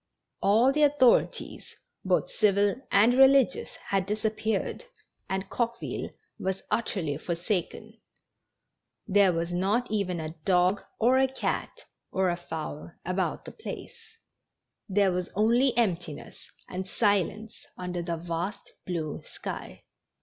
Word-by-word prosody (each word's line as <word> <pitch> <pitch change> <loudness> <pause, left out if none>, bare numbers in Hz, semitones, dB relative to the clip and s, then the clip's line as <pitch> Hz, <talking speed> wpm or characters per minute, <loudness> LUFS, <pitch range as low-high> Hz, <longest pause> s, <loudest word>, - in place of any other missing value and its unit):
All 225 +6 +5
the 300 +2 0
authorities, 285 -4 +2 0.3
both - - +1
civil 205 - +3 0.2
and 215 +5 +6
religious, 270 - +4
hau 195 - -1
disi.ppeared, 215 +2 -1 0.5
and 190 0 -2
Coqueville 235 -1 -3 0.3
was 190 0 -2
utterly 190 -9 -1
forsaken; 175 +3 -3 1.1
iliere 200 -2 +5
v - - +1
as 170 +1 -3
not 205 +7 0
even 190 -5 0
a 160 0 -5
dog 185 +1 +3 0.2
or 250 +3 +4
a 265 - +4
cat 265 - -3 0.3
or 190 -1 +2
a - - -1
fowl 160 -3 -6 0.2
about 185 +1 -1
the - - -7
placel 440 - -8 1.0
Tln 200 +1 +3
re - - +4
was 180 -1 -2
only 235 +4 +3
emptiness 175 -9 -2 0.2
and 185 +1 -5
silence 205 +1 0
under 180 -1 -3
the 170 -1 -3
vast 175 +4 -4 0.2
blue 165 -4 -3
sky. - - -7
195 Hz, 125 wpm, -28 LUFS, 180-230 Hz, 1.1 s, and